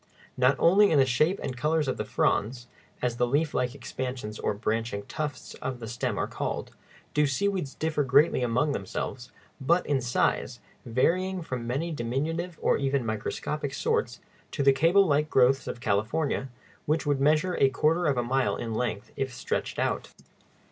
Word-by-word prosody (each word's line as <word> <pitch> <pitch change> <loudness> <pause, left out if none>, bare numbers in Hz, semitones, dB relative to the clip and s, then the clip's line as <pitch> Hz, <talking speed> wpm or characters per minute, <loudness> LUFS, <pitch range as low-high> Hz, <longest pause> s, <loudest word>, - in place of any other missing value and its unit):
Not 130 +1 +4
only 200 +4 +5
in 155 - +3
the 135 - +6
shape 155 +9 +2
and 130 - -3
colors 150 +4 +1
of 130 - -1
the - - -2
fronds 120 +4 0 0.4
(as 120 -1 0
the 125 - +2
leaf 145 +5 +1
like 125 +1 -1
expansions 125 -6 -5
or - - -1
branching 110 -1 -2
tufts 145 -5 -5
of 130 -1 -4
the 115 - -7
stem 120 +2 -2
are - - 0
called) - - -4 0.4
do 150 0 +3
seaweeds 185 0 -1
differ 155 -2 0
greatly 140 +3 +4
among 125 +5 +1
themselves, 120 +3 -4 0.3
but 170 +7 +2
in 140 -3 +1
size, 120 0 0 0.3
varying 180 +10 +1
from 125 -6 -5
many 145 +8 -2
diminutive 155 +7 -2
or - - +3
even 135 -2 0
microscopic 135 +6 -3
sorts - - -1 0.3
to 140 - -2
the 135 0 +6
cable 170 +8 +4
like 150 -1 +1
growths 135 0 +3
of 120 - -5
California, 115 +7 0 0.4
which 155 +2 +1
would 145 -2 +1
measure 155 +5 +3
a 135 - +5
quarter 155 +6 +1
of 140 -3 +1
a 120 - +1
mile 130 +2 +1
in 115 -1 -4
length 110 -3 -3
if 135 -1 -2
stretched 125 - -3
out. - - -1
135 Hz, 175 wpm, -27 LUFS, 120-155 Hz, 0.4 s, the